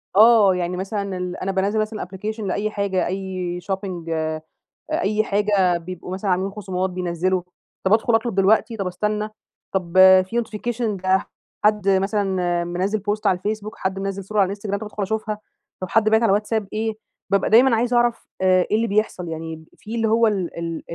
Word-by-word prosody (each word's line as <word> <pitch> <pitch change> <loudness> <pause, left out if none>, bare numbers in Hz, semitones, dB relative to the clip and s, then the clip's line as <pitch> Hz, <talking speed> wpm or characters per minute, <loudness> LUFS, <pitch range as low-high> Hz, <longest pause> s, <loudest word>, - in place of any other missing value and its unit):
آه 215 -3 +7
يعني، 180 0 -2
مثلًا 195 0 -3
ال 180 0 -4
أنا 195 - -2
بانزّل 200 +3 0
مثلًا 215 -1 -2
application 210 +4 -6
لأي 205 +1 -1
حاجة، 200 -3 0
أي 185 -1 -3
shopping 185 -4 -4
آآ 160 -1 -2 0.5
أي 215 +2 +1
حاجة 200 -4 +2
بيبقوا 180 +1 -7
مثلًا 195 0 -1
عاملين 190 +2 0
خصومات، 190 -2 -3
بينزّلوا. 180 0 -1 0.4
طب 190 +2 +3
أدخل 225 +1 +3
أطلب 225 -2 0
دلوقتي، 215 +4 +3
طب 195 -3 -2
أستنى؟ 210 +3 -2 0.4
طب 180 -3 -2 0.3
في 235 +5 -1
notification 220 -2 -3
ده 190 0 +2 0.4
حد 210 -2 +3
مثلًا 190 -3 +1
منزّل 185 +5 -1
بوست 210 +1 -1
على 185 - +4
الفيسبوك، 215 +2 -4
حد 190 0 -2
منزل 195 0 -3
صورة 210 +2 -2
على 195 - +6
الإنستجرام، 200 +1 -3
طب 220 - -6
ادخل 210 -1 -4
أشوفها. 215 +1 -2 0.4
طب 185 - -4
حد 220 -1 +3
باعت 220 +1 +4
على 225 - +4
واتساب 210 0 0
إيه؟ 220 +1 -1 0.4
بابقى 200 -1 +2
دايمًا 235 +2 +6
عايزة 240 +1 +1
أعرف 240 -1 +1
آآ 185 -1 +4
إيه 215 - +4
اللي 230 +1 +1
بيحصل؟ 205 -4 -1
يعني، 160 0 -6
في 225 +2 -7
اللي 225 -1 +1
هو 225 +1 +4
ال-ال 170 -5 -3
195 Hz, 180 wpm, -22 LUFS, 185-215 Hz, 0.5 s, آه